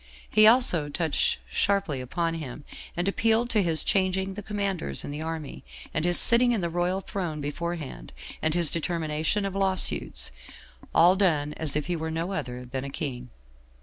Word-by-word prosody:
He 215 0 +5
also 215 - +4
touched 160 - 0
sharply 185 - -1
upon 165 +6 -2
him, 150 -3 -7 0.3
and 175 +2 -1
appealed 225 +4 +1
to 215 - +3
his 165 -4 +2
changing 190 0 0
the 210 - -7
commanders 195 - -2
in - - -6
the 150 +2 -5
army, 160 -3 -6 0.3
and 155 - 0
his 175 0 +5
sitting 240 +1 +6
in 220 - -1
the 170 -1 -3
royal 175 +3 -1
throne 175 -6 -5
beforehand, 145 - -5 0.3
and 160 +1 +1
his 170 -3 +5
determination 165 +3 -2
of 195 - -4
law 195 -1 0
suits; 185 - +1 0.6
all 175 +3 +6
done 155 -7 +1
as 150 -3 -1
if 150 - -1
he 175 - -2
were 160 0 -4
no 165 +3 -3
other 125 -9 -5
than 130 +1 -5
a 140 - -6
king. 125 -4 -5
170 Hz, 180 wpm, -26 LUFS, 150-195 Hz, 0.6 s, sitting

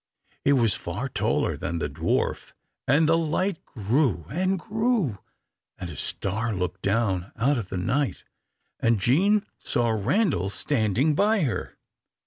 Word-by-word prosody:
It 140 - +4
was 115 -6 +3
far - - -4
taller - - 0
than 85 - -3
the 75 - -1
dwarf 75 +3 -1 0.3
and 150 +5 +4
the 165 +1 +4
light 165 +3 -1
grew 110 - 0
and 185 +5 +1
grew, 215 - 0 0.6
and 85 - -6
a - - -9
star 110 - -2
looked 90 -1 -3
down 95 -3 0
out 130 +4 +2
of 100 -5 -6
the 95 - -3
night, 130 +9 -1 0.6
and 115 -2 +2
Jean 195 - +3
saw 120 -1 0
Randal 110 - +1
standing 120 +4 +1
by 205 +5 +3
her. 130 -8 -2
120 Hz, 140 wpm, -26 LUFS, 100-165 Hz, 0.6 s, It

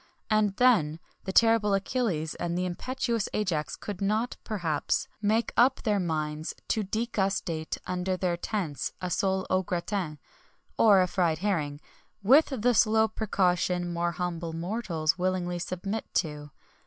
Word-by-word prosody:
And 210 -2 +3
then, 185 -12 +3 0.3
the 190 - -2
terrible 225 -1 +4
Achilles 195 -7 -1
and 170 0 -3
the 180 - 0
impetuous 230 +4 -2
Ajax 165 -8 -1
could 200 -3 -7
not, 215 +5 0
perhaps, 170 -9 -1
make 220 +2 +1
up 255 +2 +4
their 210 -3 +2
minds 155 -2 -2
to 220 - +1
degustate 195 -6 -1
under 180 +1 -1
their 180 -2 0
tents 175 -5 -3
a 180 -1 -4
sole 190 0 0
au 185 0 +3
gratin, 175 -2 -3 0.6
or 200 -4 +6
a - - 0
fried 170 -4 +1
herring, 150 -8 -1 0.4
with 275 +10 +6
the 245 -2 +1
slow 220 0 +4
precaution 180 -5 0
more 170 0 0
humble 170 -1 -3
mortals 170 -2 -1
willingly 180 -1 -1
submit 185 +5 -4
to. 150 -3 -1
185 Hz, 140 wpm, -28 LUFS, 170-215 Hz, 0.6 s, or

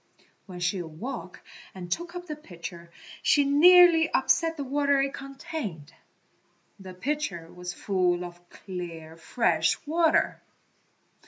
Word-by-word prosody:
When 180 -2 -9
she 180 +2 0
awoke 180 - -7 0.3
and 175 -2 -8
took 345 - -3
up 355 0 -6
the 305 -3 -5
pitcher 170 - -10 0.3
she 290 - +4
nearly 330 +3 +7
upset 330 -1 +2
the 285 - -3
water 280 +1 +1
it 275 0 0
contained. 270 - -7 0.9
The 185 -1 -10
pitcher 195 - -3
was 180 0 -6
full 180 -3 0
of 175 0 -13
clear, 170 -4 -8
fresh 165 -2 +1
water. 320 +1 +2
195 Hz, 120 wpm, -27 LUFS, -, 0.9 s, nearly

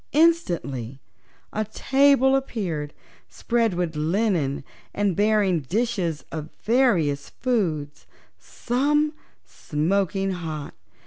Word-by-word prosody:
Instantly 170 - +1 0.5
a 215 - 0
table 265 +4 +3
appeared, 180 - -2 0.4
spread 230 -5 0
with 175 -3 -2
linen 160 -3 0 0.3
and 200 -3 +1
bearing 205 -3 +3
dishes 180 - -1
of 155 -1 -5
various 185 - +2
foods, 165 - -2 0.3
some 295 +5 0 0.3
smoking 195 +5 -1
hot. 160 -5 -5
195 Hz, 85 wpm, -24 LUFS, 155-240 Hz, 0.5 s, table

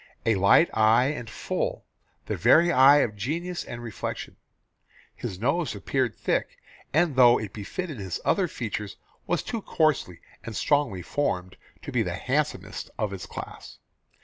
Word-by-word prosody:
A 115 - +4
light 100 - +5
eye 110 +4 +4
and 120 -6 -5
full 105 - -3 0.4
the - - -2
very 175 +2 +5
eye 140 +1 +7
of 105 - -1
genius 170 - -3
and 120 0 -8
reflection. 115 -3 -5 0.8
His 95 - -6
nose 145 - 0
appeared 130 -5 -1
thick, - - -1 0.3
and 160 -1 +2
though 120 -2 +6
it 105 - -6
befitted 145 - -5
his 95 -3 -4
other 195 -3 +2
features 105 -7 -5 0.3
was 175 - 0
too 230 -3 -4
coarsely 155 - 0 0.2
and 115 - -7
strongly 140 -12 +1
formed 95 - -2 0.3
to - - -6
be - - +1
the - - -2
handsomest - - -2
of 105 -2 -2
its 95 - -7
class. - - -9
120 Hz, 150 wpm, -26 LUFS, 105-155 Hz, 0.8 s, eye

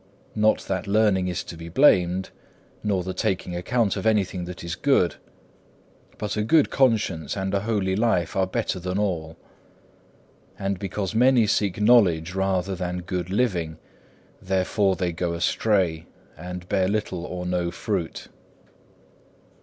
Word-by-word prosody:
Not 110 0 +2
that 95 -1 -3
learning 100 -3 +2
is 90 -1 -2
to - - -9
be 85 0 -9
blamed, 95 - +3 0.5
nor 100 -4 0
the 95 +1 -4
taking 90 -1 -2
account 100 +4 0
of - - -2
anything 95 -4 +1
that 90 -1 -8
is 85 0 -4
good; 90 - +2 1.0
but 105 -1 -3
a 105 - 0
good 150 +7 +3
conscience 110 - +1
and 95 0 -2
a 100 - +2
holy 100 -3 0
life 105 -5 +1
is 95 -1 +2
better 95 0 -2
than 90 +1 -3
all. 85 -6 -2 1.2
And 100 -1 -2
because 95 0 -3
many 125 0 +4
seek 100 -2 0
knowledge 95 -7 +4
rather 95 0 0
than 90 -1 -4
good 90 -1 -3
living, 90 -7 0 0.6
therefore 95 +1 +1
they 90 -2 -1
go 85 +1 -2
astray, 85 -2 0 0.3
and 90 +2 -8
bear 95 -1 +1
little 100 -4 -2
or 90 0 -5
no 90 -1 -1
fruit. - - -4
95 Hz, 145 wpm, -24 LUFS, 90-105 Hz, 1.2 s, many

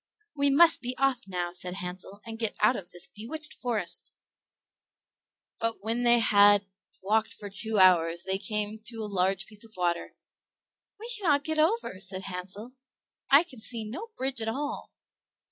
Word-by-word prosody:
"We 285 0 +2
must 330 +4 +6
be 250 0 -4
off 270 -4 +1
now," 175 -2 -3
said 180 0 -2
Hansel, 190 +2 -8
"and 225 -1 -7
get 225 -2 -2
out 215 +4 +4
of 180 -5 -7
this 175 0 -2
bewitched 300 +9 -2
forest"; 220 -9 -2 1.5
but 230 -2 -2
when 225 +3 -1
they 240 0 +5
had 205 -2 +5 0.4
walked 220 +3 +1
for 205 -1 -7
two 220 +2 0
hours 170 -3 +4
they 190 0 -1
came 210 0 -2
to 225 -1 -3
a - - -2
large 195 -1 0
piece 210 0 -12
of 225 -1 -13
water. 175 -1 -1 0.8
"We 450 - -7
cannot 290 -7 +2
get 315 0 -1
over," 320 - +1
said 190 -1 -2
Hansel. 195 +5 -6 0.6
"I 280 +4 +7
can 270 -9 -13
see 230 -1 -4
no 330 - -6
bridge 260 -2 -1
at 220 - -2
all." 285 +5 -4
220 Hz, 165 wpm, -28 LUFS, 190-255 Hz, 1.5 s, I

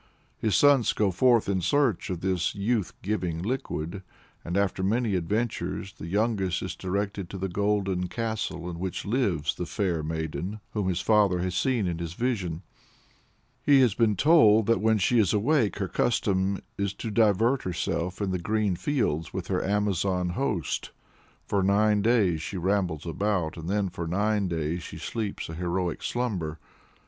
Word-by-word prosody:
His 110 -3 +1
sons 140 -5 +5
go 105 -3 +1
forth 120 +4 +3
in 95 -2 0
search 115 - +1
of 90 -2 -3
this 90 -2 0
youth 105 0 0
giving 90 -4 -2
liquid, 100 -6 -3 0.4
and, 85 +3 -2
after 100 -1 0
many 110 +3 +1
adventures, 95 0 -2
the 80 - -9
youngest 100 -1 0
is 95 - -4
directed 100 -1 -3
to 100 - -6
the 95 +1 -2
golden 95 -1 0
castle 110 -5 -3
in 85 -1 -6
which 95 0 -4
lives 100 - 0
the 90 - -5
"fair 90 -6 -1
maiden," 80 +6 -4
whom 105 -3 -1
his 90 -1 -1
father 105 -4 +3
has 90 -1 -2
seen 120 +1 +1
in 85 -2 -2
his 85 -1 -4
vision. 100 -9 -2 1.0
He 140 -2 +5
has 120 -6 +4
been 110 -1 +2
told 110 - +5
that 115 0 +2
when 110 0 +3
she 115 +4 +3
is 100 -5 +3
awake 115 +1 +2
her 100 -2 -1
custom 95 -1 +1 0.2
is 100 0 -1
to 115 - -5
divert 115 +4 +3
herself 85 0 -2
in 95 - -1
the 90 - -1
green 105 +1 0
fields 85 - -1
with 95 -3 -4
her 95 -2 0
Amazon 95 -3 0
host 90 - -2 0.6
"for 100 - 0
nine 105 +2 +3
days 100 -8 +2
she 95 - -5
rambles 90 -4 0
about, 90 -2 -1
and 80 +1 -6
then 100 0 +1
for 85 -2 -5
nine 100 +3 +1
days 85 0 -2
she - - -8
sleeps 110 -4 -4
a 80 - -7
heroic 90 0 -2
slumber." 95 -11 -2
100 Hz, 170 wpm, -27 LUFS, 90-110 Hz, 1.0 s, sons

